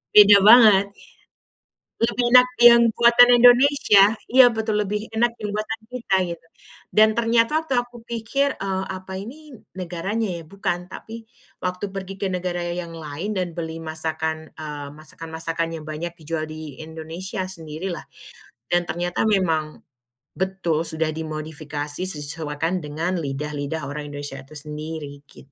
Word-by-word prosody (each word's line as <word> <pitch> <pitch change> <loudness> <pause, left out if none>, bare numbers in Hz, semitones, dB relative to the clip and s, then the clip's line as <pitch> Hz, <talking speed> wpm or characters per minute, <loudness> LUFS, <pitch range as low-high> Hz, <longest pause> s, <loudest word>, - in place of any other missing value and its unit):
Beda 205 -1 +9
banget. 205 -2 +7 1.1
Lebih 230 +1 +1
enak 250 0 +8 0.2
yang 235 0 +9
buatan 240 +1 +6
Indonesia, 245 -5 +6 0.2
iya 250 -2 +7
betul 220 -1 -1
lebih 210 +2 -4
enak 235 +1 +1
yang 210 - -3
buatan 215 +2 -3
kita 235 -6 -1
gitu 165 -1 -8 0.5
dan 215 +1 +4
ternyata 230 +5 +2
waktu 270 - -2
aku 240 -1 -3
pikir, 235 +5 -1
eee, 190 -1 -3
apa 190 0 -7
ini 295 +9 -10 0.2
negaranya 190 +4 -3
ya. 165 - -9
Bukan, 180 0 -3
tapi 225 0 -9 0.3
waktu 185 +2 -4
pergi 195 0 -7
ke 195 - 0
negara 180 -1 -3
yang 170 -1 -5
lain 165 +6 -5
dan 180 -3 -3
beli 165 0 -5
masakan, 160 0 -4
eee, 150 -2 -7
masakan-masakan 165 +1 -5
yang - - -12
banyak 170 +3 -5
dijual 155 0 -3
di 155 -3 -9
Indonesia 165 +4 -6
sendirilah 165 0 -6 0.7
dan 175 -1 +1
ternyata 175 +5 -1
memang 160 -7 0 0.5
betul 185 -4 -2
sudah 160 0 -1
dimodifikasi, 155 +1 -5
sesuaikan 155 +2 -3
dengan 165 +4 -3
lidah-lidah 145 +1 -4
orang 145 +1 -6
Indonesia 145 -1 -6
itu 135 +3 -14
sendiri 150 -1 -7
git 140 - -17
175 Hz, 135 wpm, -23 LUFS, 155-215 Hz, 1.1 s, Beda